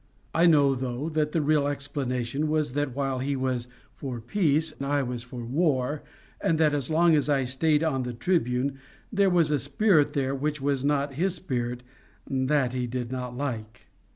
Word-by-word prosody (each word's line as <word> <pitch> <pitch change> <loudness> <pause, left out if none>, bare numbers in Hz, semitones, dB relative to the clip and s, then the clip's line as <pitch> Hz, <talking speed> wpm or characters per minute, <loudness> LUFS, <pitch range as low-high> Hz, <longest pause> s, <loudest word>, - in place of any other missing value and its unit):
I 170 +2 +5
know, 145 -4 +5
though, 130 +3 -3
that 155 -1 0
the 160 -1 +1
real 145 -1 +2
explanation 140 -1 -2
was 155 -4 0
that 145 -3 -1
while 135 -2 -1
he 140 +2 -1
was 130 -2 -1 0.3
for 130 -4 -5
peace 155 - +1
I 140 0 +1
was 125 -1 -4
for 125 -1 -8
war, 145 0 0 0.4
and 160 - +2
that 155 -2 +3
as 140 -3 -1
long 165 +1 +4
as 150 -1 +2
I 140 -2 +3
stayed 150 +4 +1
on 140 -5 0
the 125 -1 -4
Tribune 135 -2 0 0.3
there 200 -1 +4
was 170 -4 +3
a 145 - +2
spirit 150 - +3
there 135 -1 0
which 145 +2 -2
was 135 -1 0
not 140 -1 +1
his 180 +6 0
spirit 125 -8 -3 0.4
that 130 -1 +1
he 125 -1 -1
did 120 0 -4
not 125 -1 -4
like. 115 -6 -5
140 Hz, 180 wpm, -27 LUFS, 125-150 Hz, 0.4 s, I